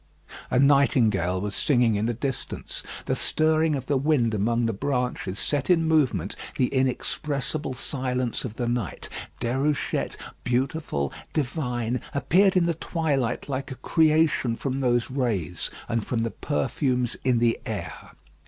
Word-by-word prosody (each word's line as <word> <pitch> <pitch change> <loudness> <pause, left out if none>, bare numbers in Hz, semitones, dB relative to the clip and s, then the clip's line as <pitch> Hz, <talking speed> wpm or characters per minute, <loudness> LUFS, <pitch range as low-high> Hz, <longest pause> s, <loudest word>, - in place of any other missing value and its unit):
A - - +1
nightingale 120 -10 +4
was 100 +1 -3
singing 120 -5 +3
in 105 +2 0
the 120 - 0
distance. 135 +2 -4 0.2
The - - 0
stirring 155 0 +2
of 130 -2 -4
the 140 +1 +1
wind 135 -6 +2
among 115 +3 +1
the 115 - 0
branches 125 -4 -2
set 145 - -1
in 165 -2 +4
movement, 125 - +2 0.2
the 125 -2 +2
inexpressible 140 +2 -1
silence 125 -2 -1
of 115 -3 -5
the 120 -1 -2
night. 120 -7 -2 0.3
Déruchette, 135 +5 0 0.3
beautiful, 125 - -1 0.2
divine, 125 -4 -1
appeared 185 +6 +4
in 175 - +4
the 170 - +2
twilight 150 -6 -1
like 135 0 -3
a 130 - -5
creation 155 -3 +2
from 135 +2 -2
those 120 -2 +1
rays 110 - -1 0.2
and 115 -2 0
from 115 0 -1
the 115 - -1
perfumes 130 -4 -1
in 125 -2 +3
the 115 0 +2
air. - - -6
130 Hz, 145 wpm, -26 LUFS, 115-145 Hz, 0.3 s, nightingale